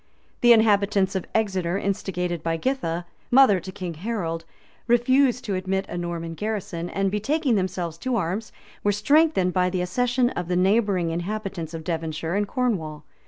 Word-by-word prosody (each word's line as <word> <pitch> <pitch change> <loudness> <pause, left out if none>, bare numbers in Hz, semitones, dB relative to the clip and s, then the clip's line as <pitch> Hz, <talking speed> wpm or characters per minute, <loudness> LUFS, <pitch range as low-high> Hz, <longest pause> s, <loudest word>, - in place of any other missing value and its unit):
The 240 - +6
inhabitants 200 -3 +4
of 190 -2 -3
Exeter, 190 -5 0
instigated 180 -4 -2
by 165 0 -1
Githa, 175 -7 -2 0.2
mother 245 -7 +6
to 185 +2 -8
King 185 -3 -5
Harold, 165 -3 -3 0.4
refused 250 +1 +3
to 205 - -2
admit 190 +1 -1
a - - -5
Norman 170 -1 -4
garrison, 180 -3 -4
and, 195 -1 0
betaking 265 +7 0
themselves 180 -4 -2
to 255 +4 -1
arms, 200 +2 -2 0.3
were 205 - +3
strengthened 210 - +3
by 180 -1 +2
the 180 -1 -1
accession 245 +6 +1
of 175 -1 -4
the 180 - 0
neighboring 190 -2 +2
inhabitants 175 -2 -4
of 160 - -6
Devonshire 160 0 -3
and 205 +1 0
Cornwall. 170 -12 -2
190 Hz, 160 wpm, -24 LUFS, 175-220 Hz, 0.4 s, The